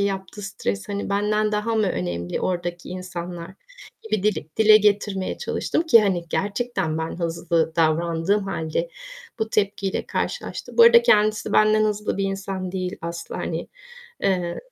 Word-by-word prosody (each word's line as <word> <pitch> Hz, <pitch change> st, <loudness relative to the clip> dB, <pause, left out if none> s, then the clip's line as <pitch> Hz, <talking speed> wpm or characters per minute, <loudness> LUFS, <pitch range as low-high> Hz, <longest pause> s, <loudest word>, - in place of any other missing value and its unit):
yaptığı 195 Hz, 0 st, -3 dB
stres, 100 Hz, -, -4 dB
hani, 200 Hz, 0 st, -3 dB
"Benden 210 Hz, +1 st, +1 dB
daha 215 Hz, +2 st, 0 dB
mı 215 Hz, -2 st, +2 dB
önemli 90 Hz, -, -3 dB
oradaki 175 Hz, -1 st, -3 dB
insanlar?" 180 Hz, -2 st, -6 dB, 0.5 s
gibi 215 Hz, -3 st, -2 dB
dili 185 Hz, -7 st, 0 dB
dile 215 Hz, -1 st, +7 dB
getirmeye 205 Hz, -2 st, +1 dB
çalıştım -, -, -1 dB
ki, 235 Hz, -10 st, +6 dB
hani, 180 Hz, -4 st, 0 dB
gerçekten 200 Hz, -6 st, -1 dB
ben 160 Hz, +2 st, -4 dB
hızlı 165 Hz, -1 st, 0 dB
davrandığım 165 Hz, +5 st, +2 dB
hâlde 175 Hz, -, -2 dB, 0.5 s
bu 220 Hz, 0 st, -2 dB
tepkiyle 200 Hz, -2 st, -1 dB
karşılaştım. -, -, -4 dB
Bu -, -, +10 dB
arada 470 Hz, 0 st, +8 dB
kendisi 215 Hz, -, +3 dB
benden 215 Hz, 0 st, +4 dB
hızlı 210 Hz, -1 st, -1 dB
bir 195 Hz, -, +1 dB
insan 195 Hz, -1 st, -4 dB
değil 185 Hz, -1 st, -3 dB
asla, 170 Hz, 0 st, -5 dB
hani, -, -, -4 dB, 0.5 s
eee, 180 Hz, -3 st, 0 dB
195 Hz, 145 wpm, -23 LUFS, 170-210 Hz, 0.5 s, Bu